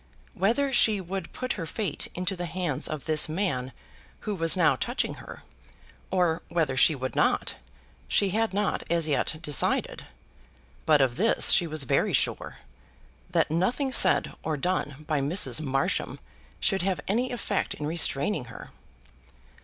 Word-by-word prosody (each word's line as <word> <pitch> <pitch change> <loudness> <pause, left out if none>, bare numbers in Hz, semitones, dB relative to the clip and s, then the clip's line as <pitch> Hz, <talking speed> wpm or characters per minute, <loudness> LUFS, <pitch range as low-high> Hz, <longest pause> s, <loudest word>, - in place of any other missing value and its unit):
Whether 255 +9 0
she 220 -4 +4
would 190 -1 -6
put 255 -1 -3
her 165 -5 -6
fate 190 -4 -2
into 185 +2 -2
the 175 -1 -5
hands 165 -5 -2
of 155 -3 -6
this 155 0 +3
man 155 -8 -2 0.5
who 210 - -3
was 165 -1 +2
now 175 - +4
touching 245 +2 -2
her, - - -11 0.7
or 175 -3 +1
whether 160 -6 0
she 150 +5 +4
would 130 -1 -5
not, - - +1 0.5
she 200 - +2
had 225 +2 0
not 205 +1 -1
as 170 -1 +1
yet 150 +1 0
decided; 150 -3 0 0.8
but 150 -2 +5
of 130 -3 +1
this 225 +6 +4
she 175 - +5
was 155 -2 -1
very 130 - +1
sure, - - 0 0.7
that - - +1
nothing 245 - 0
said 190 -7 +3
or 155 -1 -2
done 150 -3 -3
by 150 -3 0
Mrs. 140 -3 +1
Marsham 135 -2 -2 0.4
should 195 - +1
have 190 0 -1
any 245 +6 0
effect 225 -4 -2
in 150 - -5
restraining 155 -1 0
her. 115 - -11
170 Hz, 155 wpm, -26 LUFS, 150-195 Hz, 0.8 s, but